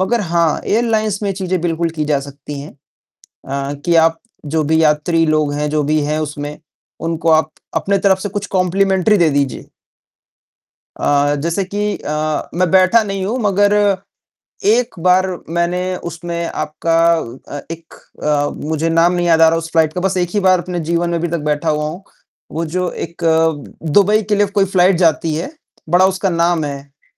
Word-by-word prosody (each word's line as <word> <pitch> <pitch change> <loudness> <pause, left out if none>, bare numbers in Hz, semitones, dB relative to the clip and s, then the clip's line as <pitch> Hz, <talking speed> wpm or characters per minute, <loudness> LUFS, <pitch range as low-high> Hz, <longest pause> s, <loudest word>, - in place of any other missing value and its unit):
मगर 230 +5 +1
हाँ, 170 -4 +1
एयरलाइंस 220 -2 +1
में 200 -1 0
चीज़ें 185 -2 -2
बिल्कुल 165 0 -1
की 155 - 0
जा 150 -2 +1
सकती 140 +1 -8
हैं 145 - -9 0.5
अ, 140 +1 -6
कि 170 - +2
आप 165 0 +4 0.3
जो 155 +2 0
भी 160 +2 +2
यात्री 155 +2 +2
लोग 155 -2 +1
हैं, 150 +1 -2
जो 150 0 0
भी 155 +2 +1
हैं 150 +1 -1
उसमें, 145 -1 -5 0.4
उनको 165 0 -1
आप 155 0 +3 0.2
अपनी 200 0 +1
तरफ 190 -1 +2
से 205 - -4
कुछ 205 +1 -4
कॉम्प्लिमेंटरी 190 +2 +2
दे 170 -4 +4
दीजिए। 140 -2 -1 1.4
अ, 145 0 +2
जैसे 170 +4 0
कि 205 +2 -2
अ, 150 0 -3
मैं 180 0 +1
बैठा 190 +4 +5
नहीं 195 -2 -3
हूँ 230 +6 -1
मगर 205 0 +3 0.9
एक 235 +3 +2
बार 185 +2 +3 0.2
मैंने 180 +2 -1 0.2
उसमें 170 +1 -4
आपका 165 +1 -2 0.6
अ, - - -6
एक 165 0 -10 0.3
अ, 145 -1 +1 0.2
मुझे 160 +1 0
नाम 165 +2 +3
नहीं 175 -1 0
याद 165 -1 +4
आ 165 - +8
रहा 165 - +1
उस 165 0 -6
फ्लाइट 160 -2 +2
का, 180 - -3
बस 190 0 0
एक 175 -1 0
ही 205 - +2
बार 185 -2 +4
अपने 180 0 -4
जीवन 170 0 +1
में 170 - 0
अभी 170 +1 -1
तक 170 0 -2
बैठा 150 +2 0
हुआ 150 0 0
हूँ, 175 +5 -9 0.5
वो 165 +1 -2
जो 180 +3 -2 0.2
एक 170 +1 -17 0.7
दुबई 210 +2 +4
के 210 - +3
लिए 205 0 +2
कोई 195 - +5
फ्लाइट 185 0 +3
जाती 165 -2 +2
है, 165 - -3 0.4
बड़ा 180 +3 +5
उसका 190 +1 0
नाम 170 -1 +1
है। 140 0 -9
170 Hz, 185 wpm, -17 LUFS, 155-190 Hz, 1.4 s, आ